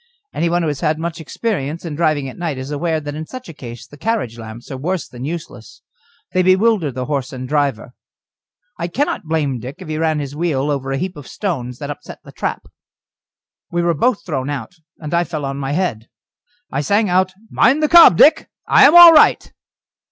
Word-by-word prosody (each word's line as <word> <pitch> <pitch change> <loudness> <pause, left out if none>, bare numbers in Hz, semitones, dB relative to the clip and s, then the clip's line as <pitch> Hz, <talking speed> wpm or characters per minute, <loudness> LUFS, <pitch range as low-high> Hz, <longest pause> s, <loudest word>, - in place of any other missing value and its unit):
Anyone 170 +1 0
who - - 0
has 145 -2 -3
had 155 +2 0
much 165 +1 -5
experience 165 -3 -4
in 165 - -5
driving 155 -3 0
at 130 - -8
night 165 -6 -4
is 130 +2 -6
aware 160 +2 -1
that 145 -1 -6
in 155 +1 -6
such 255 -1 -9
a - - -9
case 120 -5 -10
the 145 +3 -16
carriage 215 - -2
lamps 110 +3 -10
are 135 - -5
worse 175 +6 -3
than 125 +1 -8
useless; 150 -10 -8 0.5
they 185 - +3
bewilder 185 -3 +2
the 130 0 -5
horse 140 -1 -3
and 130 -2 -7
the 130 - -8
driver. 140 -5 -1 0.9
I 170 - -2
cannot 265 - -2
blame 145 -5 -1
Dick 130 +5 -8
if 185 -3 -11
he 155 0 -3
ran 160 -1 +1
his 145 -1 -5
wheel 150 -3 -1
over 135 -1 -3
a 135 - -1
heap 185 +5 -4
of 145 -3 -11
stones 125 - -4
that 145 +2 -5
upset 145 - -10
the - - -13
trap. - - -4 1.1
We 175 0 -1
were 170 0 +2
both 225 - 0
thrown 140 -5 -3
out, 140 0 -5 0.2
and 150 0 -7
I 170 0 +3
fell 155 -4 -5
on 135 0 -4
my 135 0 -3
head. 145 - -2 0.6
I 140 - -1
sang 205 +8 +1
out: 185 +1 +1 0.2
"Mind 290 +4 +3
the - - +4
cob, 335 - +8
Dick; 315 +2 +5 0.2
I - - +7
am 300 - +4
all 345 -1 +11
right." 310 - +4
155 Hz, 210 wpm, -18 LUFS, 135-180 Hz, 1.1 s, all